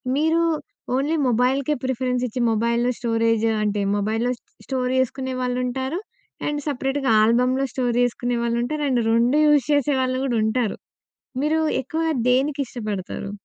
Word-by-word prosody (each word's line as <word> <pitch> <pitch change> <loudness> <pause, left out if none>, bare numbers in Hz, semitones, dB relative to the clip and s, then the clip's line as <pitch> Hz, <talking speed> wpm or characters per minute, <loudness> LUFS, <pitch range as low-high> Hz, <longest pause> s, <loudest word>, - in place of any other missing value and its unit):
మీరూ 320 +3 +2 0.5
ఓన్లీ 285 +5 +1
మొబైల్‍కే 255 +5 +1
ప్రిఫరెన్సిచ్చి, 250 -1 -1
మొబైల్‌లో 235 +2 +1
స్టోరేజ్ 230 -1 +1 0.2
అంటే, 205 -1 0
మొబైల్‍లో 220 +4 0
స్ - - -57 0.3
స్టోర్ 255 -2 -1
చేసుకునే 260 0 -1
వాళ్ళుంటారు, 255 +5 -2 0.5
అండ్ 295 0 -2
సెపరేట్‌గా 270 0 -1
ఆల్బమ్‌లో 250 +4 +2
స్టోర్ 245 -2 0
చేసుకునే 245 0 0
వాళ్ళుంటారు, 240 +6 -1
అండ్ 250 -2 +2
2 240 +5 +3
యూస్ 290 -4 +4
చేసేవాళ్ళు 260 -3 +1
గూడా 240 -4 0
ఉంటారు. 220 0 0 0.7
మీరూ 310 +2 +2 0.2
ఎక్కువా 325 +4 -2 0.2
దేనికిష్టపడతారు? 250 -8 -1
250 Hz, 120 wpm, -23 LUFS, 235-275 Hz, 0.7 s, యూస్